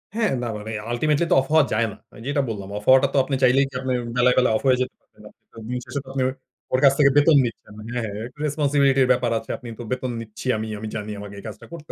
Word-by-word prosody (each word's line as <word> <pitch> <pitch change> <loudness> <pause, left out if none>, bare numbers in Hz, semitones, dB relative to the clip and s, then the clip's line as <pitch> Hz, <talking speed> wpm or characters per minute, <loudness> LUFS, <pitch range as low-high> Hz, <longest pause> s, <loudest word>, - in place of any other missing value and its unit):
হ্যাঁ, 220 -3 +1
না - - -2
মানে 110 +1 -7 0.2
আল্টিমেটলি 150 +6 +1
তো - - +6
অফ - - -6
হওয়া 155 -2 +6
যায় 115 +1 +2
না। - - -12 0.3
যেটা 145 +1 +1
বললাম, 100 -3 -5
অফ 105 - -7
হওয়াটা 130 +1 +6
তো - - +1
আপনি 135 +1 -2
চাইলেই 130 +2 +5
কি - - -23
আপনি 130 -1 -2 0.2
বেলায়, 125 0 +4
বেলায় 125 -3 +4
অফ - - -8
হয়ে 130 -1 +5
যেতে 130 - -2
পারবেন? - - -24
আপনি - - -29
তো - - -17
দিন 125 +1 -2
শেষে 140 - -4
তো - - -23
আপনার 130 -1 0 0.5
ওর 130 - +3
কাছ 135 - +7
থেকে 140 -1 +6
বেতন 150 +1 +6
নিচ্ছেন। 105 -2 -7 0.2
হ্যাঁ, 125 - -1
হ্যাঁ 105 - -5
একটু 125 +3 -19
রেসপনসিবিলিটির 140 -2 +2
ব্যাপার 125 -2 +1
আছে, 115 - -16
আপনি 125 - -11
তো - - -5
বেতন 125 0 -2
নিচ্ছি 110 +2 -9
আমি, 110 +1 -4
আমি 110 - -5
জানি 105 0 -4
আমাকে 100 0 -9
এই - - -12
কাজটা 105 -1 -9
করতে 160 -2 -9
130 Hz, 260 wpm, -23 LUFS, 115-140 Hz, 0.5 s, কাছ